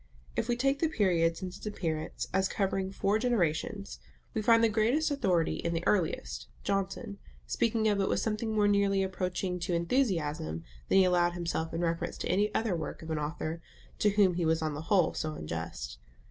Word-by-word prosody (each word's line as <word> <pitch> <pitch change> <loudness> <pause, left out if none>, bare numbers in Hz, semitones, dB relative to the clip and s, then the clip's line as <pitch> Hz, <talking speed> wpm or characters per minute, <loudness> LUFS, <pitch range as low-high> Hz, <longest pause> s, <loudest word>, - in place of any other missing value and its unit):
If - - 0
we 240 - +3
take 275 +2 +1
the 325 - +3
period 170 - +2
since 185 -1 -6
its - - -12
appearance 160 -6 -3
as 190 0 +3
covering 195 -2 -1
four 200 +2 +1
generations, 200 -4 -1 0.3
we 220 - 0
find 230 +1 +5
the - - +7
greatest 235 +9 +2
authority 180 - +1
in 170 0 -2
the 165 - -2
earliest, 155 - 0 0.2
Johnson, 195 +2 -2 0.3
speaking 220 - +1
of 205 -2 +2
it 195 - +1
with - - +1
something 220 0 -1
more 210 -1 +4
nearly 200 -1 +3
approaching 185 -1 -2
to 175 0 -1
enthusiasm 170 - 0 0.3
than - - +4
he 190 - +7
allowed 175 -1 +3
himself 170 -2 -2
in 165 - -2
reference 165 -1 -1
to - - -3
any 205 +3 +2
other 220 -5 +1
work 165 - -5
of 160 - -6
an 155 - 0
author, 155 +2 -3 0.4
to 210 - +4
whom 200 -3 +4
he 175 0 -1
was 160 0 +2
on 155 -1 -1
the 145 - -5
whole 190 -5 +4
so 155 -1 -3
unjust. 75 - -5
185 Hz, 195 wpm, -30 LUFS, 165-210 Hz, 0.4 s, the